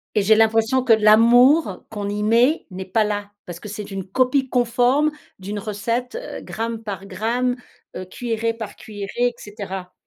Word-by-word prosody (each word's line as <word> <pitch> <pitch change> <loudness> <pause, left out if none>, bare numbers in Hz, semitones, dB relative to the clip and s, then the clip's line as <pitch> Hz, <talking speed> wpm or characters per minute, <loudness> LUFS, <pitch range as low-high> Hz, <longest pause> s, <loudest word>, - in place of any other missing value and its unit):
Et 210 - +3
j'ai 215 +2 +5
l'impression 225 +3 +3
que 245 -3 +5
l'amour 230 - +5
qu'on 205 -2 -5
y 205 +1 -3
met, 235 +8 +2
n'est 190 0 -7
pas 215 +4 +1
là, 205 -1 -3
parce 175 -1 -8
que 210 - -10
c'est 210 0 -7
une 195 -2 -5
copie 255 +6 +1
conforme 250 +4 +2 0.3
d'une 200 +2 -5
recette, 225 +4 -3
heu, - - -8
gramme 225 0 -5
par 195 -2 -6
gramme, 235 +6 -1 0.4
heu, 185 - -5
cuillerée 230 +3 -2
par 225 -2 -8
cuillerée, 205 -2 -8 0.2
et - - -14
cetera. 195 -4 -7
220 Hz, 175 wpm, -21 LUFS, 205-245 Hz, 0.4 s, j'ai